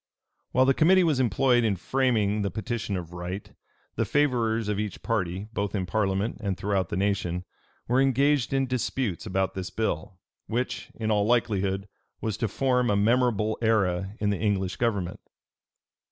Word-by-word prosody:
While 130 Hz, +1 st, +4 dB
the 135 Hz, -, +4 dB
committee 185 Hz, +6 st, +5 dB
was 155 Hz, -6 st, +2 dB
employed 125 Hz, +1 st, +3 dB
in 105 Hz, -3 st, +2 dB
framing 110 Hz, -1 st, +1 dB
the 100 Hz, -, 0 dB
petition 110 Hz, 0 st, -3 dB
of 85 Hz, -1 st, -7 dB
right, 90 Hz, +3 st, -6 dB, 0.4 s
the -, -, +2 dB
favorers 115 Hz, -6 st, +1 dB
of 105 Hz, -1 st, -1 dB
each 105 Hz, -3 st, -4 dB
party, 95 Hz, -3 st, -1 dB
both 100 Hz, -1 st, -2 dB
in 95 Hz, -2 st, -1 dB
parliament 100 Hz, +2 st, 0 dB
and 100 Hz, -4 st, -2 dB
throughout 95 Hz, -3 st, 0 dB
the -, -, -2 dB
nation, 90 Hz, -3 st, -1 dB, 0.4 s
were 125 Hz, +3 st, +3 dB
engaged 135 Hz, 0 st, +2 dB
in 135 Hz, 0 st, +2 dB
disputes 125 Hz, -5 st, -2 dB
about 95 Hz, -1 st, 0 dB
this 95 Hz, -1 st, -4 dB
bill, 95 Hz, -4 st, -3 dB, 0.3 s
which, 120 Hz, +3 st, -2 dB
in 110 Hz, -1 st, -2 dB
all 105 Hz, -1 st, +2 dB
likelihood, 100 Hz, -4 st, +1 dB, 0.3 s
was 110 Hz, -3 st, -2 dB
to 115 Hz, -, 0 dB
form 125 Hz, +2 st, +1 dB
a 105 Hz, -, +3 dB
memorable 110 Hz, 0 st, +2 dB
era 100 Hz, -4 st, +1 dB
in 105 Hz, -1 st, +1 dB
the 100 Hz, -, -2 dB
English 95 Hz, -4 st, 0 dB
government. 100 Hz, -7 st, -1 dB
105 Hz, 165 wpm, -27 LUFS, 95-120 Hz, 0.4 s, committee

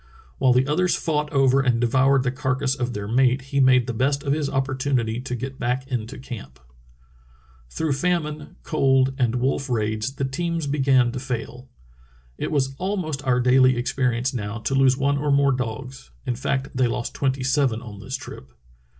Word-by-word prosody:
While 130 Hz, -2 st, +4 dB
the 125 Hz, +1 st, +3 dB
others 175 Hz, +6 st, +1 dB
fought 150 Hz, -2 st, -1 dB
over 135 Hz, -1 st, +4 dB
and 125 Hz, -3 st, +1 dB
devoured 130 Hz, +3 st, +3 dB
the 130 Hz, -, 0 dB
carcass 130 Hz, 0 st, -1 dB
of 125 Hz, -2 st, -3 dB
their 105 Hz, -2 st, -5 dB
mate 125 Hz, +3 st, +3 dB
he 140 Hz, -, +2 dB
made 130 Hz, -2 st, +5 dB
the 120 Hz, -, -3 dB
best 140 Hz, +4 st, 0 dB
of 140 Hz, -, +1 dB
his 150 Hz, -2 st, -1 dB
opportunity 130 Hz, -3 st, -1 dB
to 125 Hz, -1 st, -4 dB
get 130 Hz, +3 st, -6 dB
back 125 Hz, +2 st, -1 dB
into 125 Hz, -1 st, -4 dB
camp." 115 Hz, -, -9 dB, 1.1 s
Through 150 Hz, -, -1 dB
famine, 150 Hz, -1 st, -2 dB
cold, 135 Hz, -1 st, +2 dB
and 120 Hz, -2 st, +1 dB
wolf 135 Hz, +2 st, -1 dB
raids 110 Hz, +2 st, -1 dB
the 135 Hz, -, -1 dB
teams 165 Hz, +4 st, -2 dB
be 145 Hz, +1 st, -2 dB
gan 130 Hz, -3 st, +4 dB
to 130 Hz, -, -5 dB
fail. 125 Hz, 0 st, -5 dB, 0.7 s
It -, -, -2 dB
was 135 Hz, -3 st, 0 dB
almost 175 Hz, -7 st, -2 dB
our 125 Hz, -1 st, +3 dB
daily 130 Hz, 0 st, +4 dB
experience 125 Hz, 0 st, 0 dB
now 105 Hz, -2 st, -4 dB
to 135 Hz, -, -2 dB
lose 135 Hz, -1 st, +4 dB
one 140 Hz, +1 st, +1 dB
or 145 Hz, +1 st, -1 dB
more 140 Hz, 0 st, +4 dB
dogs 125 Hz, +1 st, -5 dB, 0.2 s
[in 125 Hz, -, 0 dB
fact, 130 Hz, +2 st, -2 dB
they 130 Hz, -1 st, +2 dB
lost 120 Hz, 0 st, -3 dB
tvventy 135 Hz, -1 st, -1 dB
sevep 130 Hz, -4 st, +1 dB
on 105 Hz, -3 st, -9 dB
this 130 Hz, +6 st, -5 dB
trip]. 65 Hz, -, -11 dB
130 Hz, 185 wpm, -23 LUFS, 125-140 Hz, 1.1 s, made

